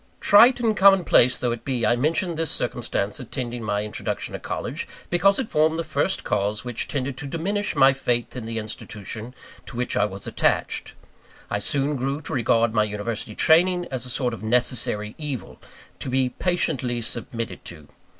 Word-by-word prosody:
Trite 235 +5 +6
and 225 -3 +1
common 195 -1 +6
place 125 -5 +4
though 125 - -1
it 115 0 -5
be, 125 -4 -1
I 120 - +3
mention 165 +7 0
this 165 -1 0
circumstance 115 -4 0
attending 120 -1 -5
my 105 -1 -1
introduction 105 - -3
to - - -4
college, - - -4 0.2
because 190 +3 +4
it 265 - -2
formed 155 -1 +2
the 165 - -1
first 190 +3 -1
cause 105 +2 -1
which 120 -2 -2
tended 135 -1 -3
to 145 - -6
diminish 200 +7 -2
my 135 0 +6
faith 120 -3 -1
in 125 -3 -5
the 115 0 -4
institution 110 +2 -6 0.3
to - - -8
which 125 0 -1
I 105 - +3
was 100 -1 -7
attached. - - 0 0.6
I - - 0
soon 140 +1 0
grew 135 +3 -2
to 160 - -5
regard 115 -3 +2
my 110 -2 +3
university 105 +1 -3
training 175 +2 +4
as 130 -2 -3
a 125 - -5
sort 125 -1 0
of 115 - -7
necessary 110 -2 0
evil, 145 -8 -6 0.4
to - - -5
be 130 0 +1
patiently 130 -6 -1
submitted 115 0 -5
to. 75 -4 -10
125 Hz, 180 wpm, -24 LUFS, 115-160 Hz, 0.6 s, Trite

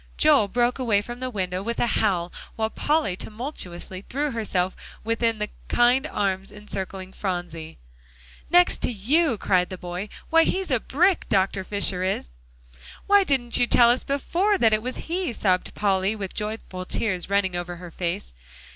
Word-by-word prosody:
Joel 295 -9 +5
broke 240 +4 +1
away 215 -5 +2
from 240 +3 -8
the 255 0 -3
window 185 -5 -2
with 235 +3 -3
a - - +3
howl, 185 -7 0 0.2
while 220 0 -1
Polly 295 - +1
tumultuously 190 - -6
threw 290 +2 -1
herself 190 -5 -1 0.3
within 230 0 0
the 210 0 -3 0.2
kind 245 +2 +3
arms 195 -1 -2
encircling 195 -2 -6
Phronsie. 175 -4 -4 0.7
"Next 355 +1 +4
to - - 0
you," 250 - +1
cried 180 -2 +2
the 185 - -6
boy, 180 +3 -5 0.2
"why, 330 0 +6
he's 375 -1 -1
a 255 - +3
brick, 355 - +1
Dr. 190 -1 +1
Fisher 195 -2 0
is!" 185 - -2 0.7
"Why 405 0 +5
didn't 260 -7 +2
you 245 - +3
tell 240 -1 +6
us 250 - +2
before 350 +9 +1
that 225 -9 +4
it 215 - +2
was 255 +2 -4
he?" 350 -3 -1
sobbed 185 -4 0
Polly, 195 0 +1
with 195 -3 -5
joyful 210 -3 -4
tears 185 -1 -2
running 200 -2 +1
over 175 0 -4
her 175 0 -10
face. 170 - -3
210 Hz, 165 wpm, -24 LUFS, 185-250 Hz, 0.7 s, why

